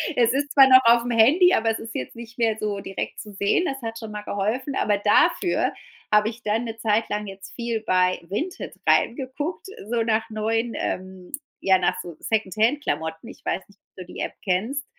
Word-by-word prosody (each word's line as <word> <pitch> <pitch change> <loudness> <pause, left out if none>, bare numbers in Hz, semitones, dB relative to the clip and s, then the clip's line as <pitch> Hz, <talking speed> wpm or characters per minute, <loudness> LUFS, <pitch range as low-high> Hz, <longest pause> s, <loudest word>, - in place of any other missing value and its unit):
Es 235 -1 +3
ist 285 +1 -1
zwar 270 -2 +8
noch 260 0 +8
aufm 235 +1 +5
Handy, 305 +12 +5
aber 225 0 +1
es 220 - -4
ist 225 0 -9
jetzt 125 - -5
nicht 235 +1 -11
mehr 225 -2 +2
so 205 -2 -2
direkt 195 0 -5
zu 210 - -9
sehen. 200 - +1
Das 270 -3 -3
hat 225 0 -5
schon 220 -2 -8
mal 210 0 -5
geholfen, 225 +8 -2
aber 205 -4 +1
dafür 335 - +2 0.4
habe 210 +1 +5
ich 235 +1 -11
dann 220 +3 0
'ne 225 0 -6
zeitlang 210 -1 0
jetzt 195 0 -10
viel 235 -2 -2
bei 185 0 +2
Vinted 215 - -5
reingeguckt, 270 +7 0 0.2
so 235 -1 +1
nach 225 0 0
neuen, 225 +2 -1
ähm 185 -1 -5 0.3
ja 190 -1 +4
nach 180 - 0
so 170 -3 -9
Secondhand-Klamotten. 215 - -1
Ich - - -14
weiß 190 - -2
nicht, 200 -1 -24
ob - - -74
du 180 - -13
die - - -8
App - - -3
kennst? 225 +10 -1
225 Hz, 195 wpm, -24 LUFS, 200-245 Hz, 0.4 s, zwar